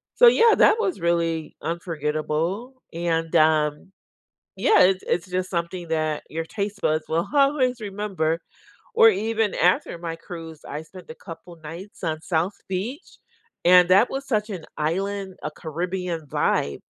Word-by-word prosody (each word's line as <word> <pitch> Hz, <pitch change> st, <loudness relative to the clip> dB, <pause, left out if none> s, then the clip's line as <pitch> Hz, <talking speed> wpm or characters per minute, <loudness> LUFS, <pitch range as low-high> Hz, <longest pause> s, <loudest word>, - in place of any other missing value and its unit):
so -, -, +7 dB
yeah, 465 Hz, -1 st, +6 dB
that -, -, +6 dB
was 380 Hz, -, -1 dB
really 165 Hz, -2 st, 0 dB
unforgettable, 165 Hz, -, -2 dB, 0.2 s
and, 165 Hz, -1 st, -1 dB
um, 155 Hz, +2 st, +2 dB, 0.7 s
yeah, 445 Hz, -, +4 dB
it 185 Hz, 0 st, +5 dB
it's 175 Hz, +1 st, 0 dB
just 185 Hz, 0 st, -2 dB
something 170 Hz, 0 st, -3 dB
that 155 Hz, -1 st, -1 dB
your 165 Hz, +1 st, -4 dB
taste 205 Hz, +2 st, -4 dB
buds 155 Hz, 0 st, +1 dB
will 165 Hz, +2 st, 0 dB
always 275 Hz, -3 st, +3 dB
remember, 195 Hz, -6 st, -2 dB, 0.6 s
or 225 Hz, -, +8 dB
even 220 Hz, +1 st, 0 dB
after 175 Hz, -1 st, +2 dB
my 165 Hz, -1 st, -5 dB
cruise, 165 Hz, -2 st, -9 dB
I 150 Hz, +2 st, -5 dB
spent 180 Hz, +1 st, -14 dB
a -, -, -10 dB
couple 170 Hz, +1 st, -11 dB
nights 165 Hz, +7 st, -10 dB
on 155 Hz, -2 st, -2 dB
South 175 Hz, +4 st, -1 dB
Beach, 220 Hz, -, -5 dB, 0.5 s
and 180 Hz, 0 st, +7 dB
that 195 Hz, +6 st, +5 dB
was 275 Hz, +1 st, -4 dB
such 215 Hz, -3 st, 0 dB
an 175 Hz, -5 st, -6 dB
island, 190 Hz, +5 st, -2 dB
a 150 Hz, -, -2 dB
Caribbean 170 Hz, 0 st, -4 dB
vibe, 70 Hz, -, 0 dB
175 Hz, 150 wpm, -24 LUFS, 160-200 Hz, 0.7 s, or